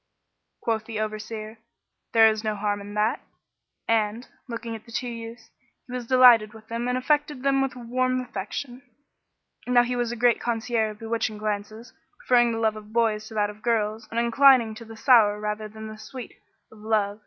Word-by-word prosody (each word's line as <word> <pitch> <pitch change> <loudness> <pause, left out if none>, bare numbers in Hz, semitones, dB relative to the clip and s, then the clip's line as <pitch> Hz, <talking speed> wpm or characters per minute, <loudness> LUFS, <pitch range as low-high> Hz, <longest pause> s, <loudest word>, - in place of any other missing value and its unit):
Quoth 220 -2 -1
the 220 -1 -5
Overseer, 215 +1 -5 0.5
"There 225 -1 +7
is 215 0 0
no 215 -1 -1
harm 205 0 -2
in 205 +1 -9
that;" 210 +2 +1 0.7
and, 225 +1 0 0.2
looking 230 -1 -5
at 220 - -10
the - - -13
two 245 - -3
youths, 230 -1 -8 0.3
he 250 - -10
was 250 -2 -5
delighted 240 -4 +6
with 220 0 -14
them 230 +1 -3
and 250 0 0
affected 295 0 0
them 275 -1 +2
with 270 -1 -1
a - - -9
warm 255 +2 0
affection. 245 +2 -6 0.9
Now 245 -1 +5
he 245 +1 -2
was 240 -1 -1
a - - -3
great 240 0 +2
connoisseur 230 -1 0
of 210 - -9
bewitching 225 -1 -2
glances, 215 +2 -5 0.2
preferring 240 -1 +3
the 225 - -2
love 220 -1 +1
of 215 0 -11
boys 220 -2 +1
to 220 - -11
that 210 -1 +1
of 210 +1 -17
girls 220 -1 -1
and 230 - -2
inclining 235 -1 +5
to 230 +2 -10
the 225 0 -11
sour 220 -5 +5
rather 210 0 -3
than 220 +1 -10
the 215 0 -9
sweet 255 0 -9 0.4
of 220 - -16
love. 210 -1 0
225 Hz, 195 wpm, -25 LUFS, 215-245 Hz, 0.9 s, There